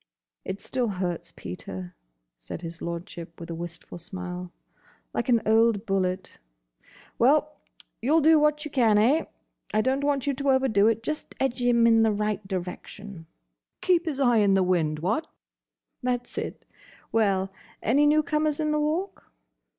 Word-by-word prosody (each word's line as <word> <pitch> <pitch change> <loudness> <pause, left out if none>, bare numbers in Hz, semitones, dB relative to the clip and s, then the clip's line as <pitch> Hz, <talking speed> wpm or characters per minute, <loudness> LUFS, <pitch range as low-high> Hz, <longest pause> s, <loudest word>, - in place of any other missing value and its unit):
"It 190 - -5
still 250 -2 -1
hurts, 175 -4 -3
Peter," 90 0 -7 0.4
said - - -8
his 165 0 -7
Lordship 170 0 -6
with 170 0 -7
a - - -3
wistful 170 +1 -8
smile. 180 -1 -6 0.6
"Like - - -2
an 235 -2 +4
old 225 -1 +3
bullet.—Well! 185 - -2 0.5
You 275 +7 +2
'll 325 - +5
do 315 +1 +6
what 300 0 +2
you 300 - -6
can, 230 -6 +4
eh?—I 225 -3 0
don't 265 +4 0
want 285 -2 +1
you 285 - +1
to 280 +1 -1
overdo 260 -6 +4
it. 225 0 +1
Just 305 +4 -4
edge 260 -2 0
him 240 -1 +4
in 225 -1 +5
the 220 -1 +4
right 210 -1 -2
direction." 185 -1 -6 0.5
"Keep 355 -2 +3
his 285 -4 -2
eye 245 -4 +4
in 200 -2 +4
the 190 - +4
wind, 165 -4 +1
what?" 215 - -1 0.7
"That's 245 -1 -2
it.—Well? 195 -4 -3 0.3
Any 285 +6 +4
new 305 +1 +4
comers 305 0 0
in 305 -1 0
the 300 - +1
Walk?" 325 +6 -2
220 Hz, 150 wpm, -26 LUFS, 180-280 Hz, 0.7 s, do